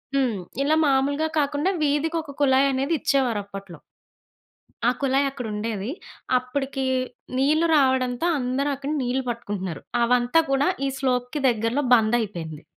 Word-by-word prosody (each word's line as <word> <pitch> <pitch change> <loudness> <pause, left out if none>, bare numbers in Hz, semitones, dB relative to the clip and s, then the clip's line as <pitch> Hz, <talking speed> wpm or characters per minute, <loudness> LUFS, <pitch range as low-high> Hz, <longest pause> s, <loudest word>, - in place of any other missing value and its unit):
హ్మ్. 255 -5 +1 0.3
ఇలా 310 +3 +2
మామూలుగా 285 +3 +1
కాకుండా 290 +6 0
వీధికొక 300 +1 -1
కుళాయనేది 270 +2 +3
ఇచ్చేవారప్పట్లో. 200 - -1 1.1
ఆ! - - +6
కుళాయక్కడుండేది. 245 -6 -1 0.5
అప్పటికి 270 +1 -3 0.5
నీళ్ళు 305 +5 +3
రావడంతో 260 +1 +2
అందరూ 255 +3 -1
అక్కడ 280 +2 -5
నీళ్ళు 255 +2 -1
పట్టుకుంటున్నారు. 205 -7 -5 0.2
అవంతా 245 +6 +3
కూడా 275 +3 +2 0.2
ఈ - - 0
స్లోప్‌కి 255 +2 -1
దగ్గరలో 230 +5 -1
బందయిపేయింది. 210 -9 0
260 Hz, 105 wpm, -24 LUFS, 235-280 Hz, 1.1 s, ఆ